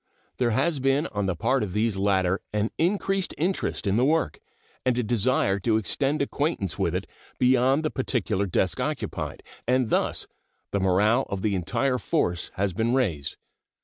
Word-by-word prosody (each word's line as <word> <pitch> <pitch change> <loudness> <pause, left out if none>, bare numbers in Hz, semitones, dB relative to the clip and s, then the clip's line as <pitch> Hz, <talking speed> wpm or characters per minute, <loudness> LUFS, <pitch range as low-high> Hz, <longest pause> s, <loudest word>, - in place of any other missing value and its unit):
There 125 -2 +2
has 140 +7 +1
been 135 +3 +2
on 105 -2 -1
the 95 - 0
part 130 +7 +1
of 95 -4 -3
these 110 0 +1
latter 95 -1 +1
an 105 +1 0
increased 195 +2 +1
interest 180 -4 -1
in 100 +1 +2
the 120 - +3
work 160 +3 +1 0.4
and 125 -1 +1
a 125 - +1
desire 110 -3 +1
to 110 +2 +2
extend 140 +7 0
acquaintance 140 - -2
with - - +1
it - - -2 0.3
beyond 130 +4 +3
the 155 - 0
particular 110 -6 -1
desk 90 - 0
occupied, - - -3 0.2
and 125 -2 +2
thus - - +1 0.5
the 100 - 0
morale 105 +7 +3
of 100 -1 -3
the 105 -2 +1
entire 125 +8 0
force 90 - -1
has 100 -1 0
been 115 +6 +1
raised. 80 - -1
115 Hz, 170 wpm, -26 LUFS, 100-135 Hz, 0.5 s, the